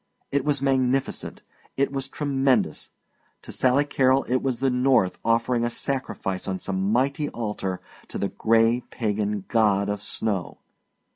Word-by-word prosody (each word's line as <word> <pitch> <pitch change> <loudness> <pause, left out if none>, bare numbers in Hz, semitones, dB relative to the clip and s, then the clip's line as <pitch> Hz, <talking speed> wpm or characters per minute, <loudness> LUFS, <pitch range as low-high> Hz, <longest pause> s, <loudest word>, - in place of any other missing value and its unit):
It 140 -1 +1
was 145 -2 0
magnificent, 135 0 0 0.3
it 140 +1 +1
was 135 0 -3
tremendous! 135 - 0 0.5
To - - -9
Sally 130 +3 +2
Carol 135 -1 +3
it 130 - +1
was 130 -4 -1
the 135 0 +2
North 125 -6 +2
offering 115 +1 +2
sacrifice 120 -8 -3
on 95 -1 -1
some 95 +1 -1
mighty 140 +5 +1
altar 105 -5 -4 0.3
to - - -6
the 100 - -1
gray 115 +2 +3
pagan 105 -3 -2
God 105 -3 +2
of 105 -1 -2
Snow. 105 -3 -3
120 Hz, 140 wpm, -25 LUFS, 105-135 Hz, 0.5 s, Carol